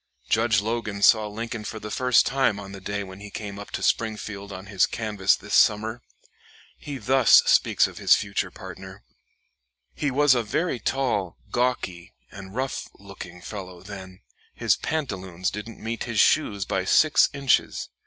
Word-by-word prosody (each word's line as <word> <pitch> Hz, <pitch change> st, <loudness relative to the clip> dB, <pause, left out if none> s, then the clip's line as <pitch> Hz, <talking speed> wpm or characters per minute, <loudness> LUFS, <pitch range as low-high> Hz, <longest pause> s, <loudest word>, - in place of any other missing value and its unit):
Judge 110 Hz, -, +2 dB
Logan 105 Hz, -2 st, -3 dB
saw 110 Hz, -2 st, +5 dB
Lincoln 115 Hz, +1 st, -5 dB
for 110 Hz, +1 st, -6 dB
the 105 Hz, 0 st, -7 dB
first 125 Hz, 0 st, +3 dB
time 135 Hz, -6 st, +1 dB
on 100 Hz, -1 st, -9 dB
the 100 Hz, -1 st, -9 dB
day 100 Hz, 0 st, -3 dB
when 95 Hz, 0 st, -11 dB
he 105 Hz, 0 st, -9 dB
came 100 Hz, -1 st, -7 dB
up 100 Hz, -, -9 dB
to -, -, -5 dB
Springfield 105 Hz, -2 st, -2 dB
on 95 Hz, 0 st, -8 dB
his 100 Hz, -2 st, +2 dB
canvass 105 Hz, -4 st, +1 dB
this -, -, -9 dB
summer. 110 Hz, +3 st, +3 dB, 0.7 s
He 145 Hz, -2 st, -7 dB
thus 130 Hz, +2 st, +5 dB
speaks -, -, +4 dB
of -, -, -7 dB
his -, -, +6 dB
future 100 Hz, -2 st, -2 dB
partner: 95 Hz, +2 st, -11 dB, 0.9 s
"He 145 Hz, -, -1 dB
was 145 Hz, +1 st, +4 dB
a 120 Hz, -, +1 dB
very 140 Hz, +4 st, -1 dB
tall, 115 Hz, -11 st, -1 dB
gawky, 120 Hz, -8 st, -2 dB, 0.2 s
and 95 Hz, 0 st, -10 dB
rough 130 Hz, +1 st, -3 dB
looking 95 Hz, -3 st, -11 dB
fellow 95 Hz, -3 st, -8 dB
then; 95 Hz, -2 st, -10 dB, 0.3 s
his -, -, +2 dB
pantaloons 95 Hz, -, -3 dB
didn't 105 Hz, +2 st, -8 dB
meet 115 Hz, +1 st, -4 dB
his 115 Hz, -3 st, -2 dB
shoes 100 Hz, -10 st, +3 dB
by 95 Hz, 0 st, -1 dB
six 155 Hz, +9 st, +4 dB
inches. 140 Hz, -2 st, 0 dB
105 Hz, 165 wpm, -25 LUFS, 95-120 Hz, 0.9 s, his